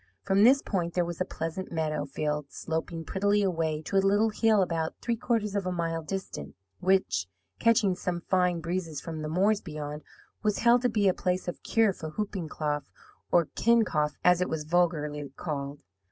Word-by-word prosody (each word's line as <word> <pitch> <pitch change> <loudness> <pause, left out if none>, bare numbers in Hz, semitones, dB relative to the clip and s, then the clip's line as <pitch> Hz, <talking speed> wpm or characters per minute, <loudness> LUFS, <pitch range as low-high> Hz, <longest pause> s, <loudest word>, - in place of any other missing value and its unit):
From 200 +1 +3
this 265 +4 +6
point 175 -4 -2
there 175 -1 +2
was 170 +1 -5
a - - +2
pleasant 165 +3 -5
meadow 155 -3 -1
field 150 +1 -2
sloping 165 0 -4
prettily 205 +3 +1
away 160 -4 0
to 195 - -1
a - - +7
little 210 +3 +3
hill 215 -2 +3
about 165 -2 -2
three 235 - -1
quarters 225 -3 -1
of 195 -2 -1
a - - 0
mile 165 -2 -1
distant; 160 - -6 0.2
which, 100 - +2 0.3
catching 225 -4 +4
some 180 -1 -3
fine 180 -2 +1
breezes 165 -3 -3
from 160 +1 -6
the 155 - -3
moors 200 +6 +2
beyond, 150 -2 -6 0.4
was 210 -1 +1
held 240 +1 +5
to 250 - +2
be 210 -3 +2
a 185 - +4
place 180 0 -1
of 175 - -4
cure 225 -3 +2
for 160 -3 -7
whooping 190 -2 -4
cough, 150 -1 -2 0.4
or 175 -2 +5
kincough, 210 -11 +2
as 180 0 +5
it 180 - 0
was 160 -1 -2
vulgarly 150 -3 0
called. 140 -3 -4
175 Hz, 185 wpm, -28 LUFS, 155-200 Hz, 0.4 s, a